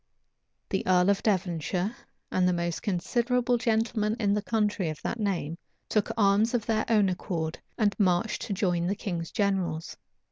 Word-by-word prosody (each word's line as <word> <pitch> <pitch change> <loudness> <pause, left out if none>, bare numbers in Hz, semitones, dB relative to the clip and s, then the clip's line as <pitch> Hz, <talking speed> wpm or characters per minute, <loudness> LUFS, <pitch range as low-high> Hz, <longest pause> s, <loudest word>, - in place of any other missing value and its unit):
The 190 - 0
earl 180 +1 +5
of 200 - 0
Devonshire, 185 +1 0 0.4
and 185 -1 +2
the 180 - +3
most 170 -1 -2
considerable 240 +6 +1
gentlemen 220 -2 +1
in 200 -3 +2
the 210 - +1
county 210 -5 0
of 155 - -5
that 230 - -3
name, 175 -6 -2 0.3
took 215 -2 +1
arms 210 +3 +3
of 230 -3 -1
their 220 -1 +1
own 210 -3 +4
accord, 175 -3 -3 0.2
and 210 -2 +2
marched 185 +2 +2
to 205 - -1
join 175 -4 0
the 200 - 0
king's 175 -6 -4
generals. 190 -6 -1
200 Hz, 165 wpm, -28 LUFS, 175-220 Hz, 0.4 s, earl